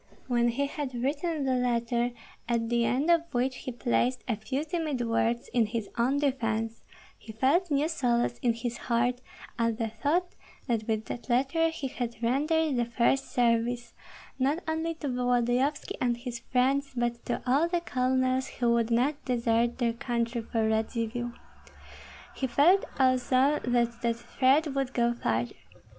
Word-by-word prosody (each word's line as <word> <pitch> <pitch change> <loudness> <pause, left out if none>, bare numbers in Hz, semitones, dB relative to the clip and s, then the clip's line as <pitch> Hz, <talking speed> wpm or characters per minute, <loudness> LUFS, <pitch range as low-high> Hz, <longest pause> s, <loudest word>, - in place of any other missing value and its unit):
When 240 -2 +2
he 255 +4 0
had 280 -2 -4
written 290 +5 -1
the 260 - +1
letter, 240 -1 +1 0.4
at 230 -1 0
the 235 -1 +2
end 275 +8 +2
of 335 -1 +2
which 255 +1 0
he 260 - -5
placed 245 +1 0
a 235 - +1
few 260 +7 -3
timid 310 -5 -2
words 230 +1 0
in 235 -3 +3
his 225 -1 -4
own 250 +4 +2
defence, 225 -5 -1 0.4
he 220 - -10
felt 280 - +2
new 290 +1 +2
solace 240 -7 0
in 240 -2 +2
his 235 0 -4
heart 245 +1 +1 0.4
at 230 -1 +1
the 225 -1 -1
thought 300 +11 -1 0.3
that 230 -4 -1
with 220 -1 -1
that 245 - -7
letter 275 +7 +2
he 320 -4 -4
had 245 -2 -4
rendered 300 +4 +1
the 240 - +2
first 235 +3 +1
service, 240 -1 +1 0.5
not 285 +7 +1
only 320 +1 -1
to 310 -2 -5
Volodyovski 250 +2 0
and 240 -1 +1
his 240 -1 -6
friends, 270 +3 +1
but 240 0 -1
to 240 - -2
all 275 +6 +3
the 345 0 0
colonels 260 -2 +1
who 240 -2 0
would 230 -1 +1
not 260 +6 +1
desert 235 -1 +1
their 235 -2 +1
country 235 0 -2
for 225 0 -1
Radzivill. 230 +2 -1 1.0
He 265 - -1
felt 320 +10 +4
also 260 +2 +3
that 240 -1 +1
that 235 -1 +1
thread 270 +5 +2
would 270 -1 -2
go 235 0 +2
farther. 120 - -1
245 Hz, 160 wpm, -28 LUFS, 235-275 Hz, 1.0 s, felt